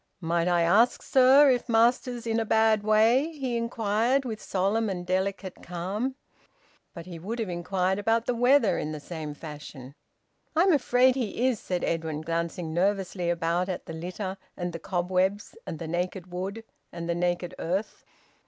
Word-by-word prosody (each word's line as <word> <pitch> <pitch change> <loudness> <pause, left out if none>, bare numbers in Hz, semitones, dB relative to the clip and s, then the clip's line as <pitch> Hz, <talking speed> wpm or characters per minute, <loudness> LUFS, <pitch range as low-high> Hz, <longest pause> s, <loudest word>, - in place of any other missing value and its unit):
"Might 170 0 0
I 175 -1 +3
ask, 215 +9 +3
sir, 270 +2 +6
if 245 0 -1
Master's 240 +1 +2
in 225 0 0
a - - +1
bad 220 -1 +3
way?" 225 +8 +3
he 265 -5 -3
inquired, 230 +3 0
with 220 -3 -5
solemn 200 +4 0
and 180 -2 -4
delicate 190 +1 -2
calm. 195 +9 -3 0.8
But 170 -1 -8
he 175 -2 -8
would 215 +8 -5
have 225 -5 -3
inquired 180 +2 -1
about 225 +2 +1
the 245 - 0
weather 245 -1 +3
in 155 - -3
the 155 - -5
same 155 -1 -6
fashion. 145 -4 -9 0.6
"I'm 355 +3 +5
afraid 255 -2 +4
he 245 -1 -2
is," 245 -5 0
said 180 -1 -3
Edwin, 160 -2 -2
glancing 165 0 -3
nervously 185 -1 0
about 175 +2 0
at 185 - -4
the 165 - -7
litter, 185 +4 -5 0.2
and 175 -1 -3
the 165 - -5
cobwebs, 185 +3 -1
and - - -4
the 165 - -6
naked 180 +2 -3
wood, 195 +5 -4 0.3
and 170 -1 -6
the 170 - +1
naked 175 0 -1
earth. 190 +6 -3
190 Hz, 170 wpm, -27 LUFS, 175-230 Hz, 0.8 s, sir